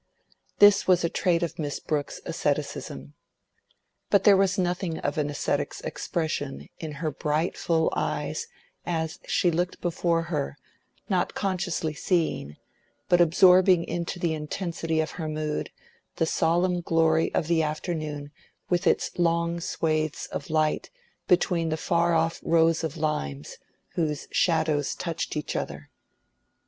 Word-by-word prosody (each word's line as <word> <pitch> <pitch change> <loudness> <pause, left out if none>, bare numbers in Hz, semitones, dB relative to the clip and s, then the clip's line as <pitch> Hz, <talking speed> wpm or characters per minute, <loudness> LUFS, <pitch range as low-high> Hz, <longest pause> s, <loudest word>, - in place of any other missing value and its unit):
This 205 -1 +6
was 180 -2 +4
a 170 - +2
trait 175 -1 +1
of 170 - -4
Miss 145 -2 -3
Brooke's 150 -2 -3
asceticism. 70 +1 -3 1.0
But 200 -1 +4
there 205 - +7
was 190 0 +2
nothing 180 -2 -1
of 145 +2 -2
an 145 -1 0
ascetic's 145 - -2
expression 155 -4 -3
in 155 -2 -5
her 155 +1 -3
bright 150 +3 -1
full 160 -1 +1
eyes, - - -2 0.4
as 160 0 -2
she 175 - +2
looked 175 +2 -1
before 170 -1 0
her, 150 -4 -3 0.5
not 185 -3 0
consciously 180 -5 -1
seeing, 155 - -1 0.5
but 175 0 +5
absorbing 180 +1 +6
into 170 +1 -3
the 170 -2 0
intensity 160 +1 -2
of 155 - -3
her 160 -3 -5
mood, 155 0 -2 0.5
the 165 - +1
solemn 175 +3 +1
glory 160 -1 +2
of - - +1
the 165 0 +2
afternoon 155 -2 -3 0.4
with 175 +1 +2
its - - +1
long 170 0 +1
swathes 155 -3 -1
of - - -5
light 155 -1 +1 0.4
between 175 -2 +2
the 155 - -1
far 170 +1 +2
off 165 +1 +1
rows 165 0 +3
of 160 -1 -3
limes, 75 - -3 0.3
whose 150 -4 -2
shadows 155 -4 +1
touched 165 -2 -3
each 150 - -3
other. - - -5
165 Hz, 135 wpm, -26 LUFS, 155-175 Hz, 1.0 s, there